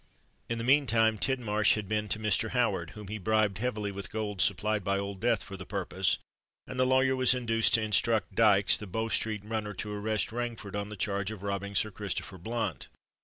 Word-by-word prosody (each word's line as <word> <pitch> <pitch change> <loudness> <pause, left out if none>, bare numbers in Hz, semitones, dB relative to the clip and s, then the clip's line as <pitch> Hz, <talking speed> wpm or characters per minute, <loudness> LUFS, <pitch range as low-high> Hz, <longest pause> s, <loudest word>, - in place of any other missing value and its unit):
In 115 - -1
the 115 - -3
meantime, 115 -5 +3
Tidmarsh 110 -5 +2
had 105 -2 -4
been 105 0 -1
to - - +1
Mr. 110 +1 +1
Howard, 100 -9 0
whom 105 -2 -8
he 110 +2 -5
bribed 105 -1 +1
heavily 105 -4 -2
with 100 -2 -6
gold 105 -3 -3
supplied 105 +2 +1
by 100 +1 +1
Old 100 -1 -4
Death 115 -1 +1
for 100 - -8
the 95 - -7
purpose; 95 -1 0 0.5
and 130 - -6
the 130 - +4
lawyer 130 0 +3
was 130 0 +4
induced 115 -2 +2
to 110 - +1
instruct 110 0 +2
Dykes, 100 -2 +5
the 105 - -8
Bow 110 +5 -2
Street 110 -2 -1
runner 105 -2 -3
to 105 +2 -5
arrest 105 +1 -1
Rainford 115 -4 -4
on 100 0 -3
the 105 - -8
charge 100 0 -1
of 110 -3 -8
robbing 100 0 -3
Sir 110 +3 +2
Christopher 95 -2 -4
Blunt. 115 +6 -3
105 Hz, 205 wpm, -30 LUFS, 100-115 Hz, 0.5 s, Dykes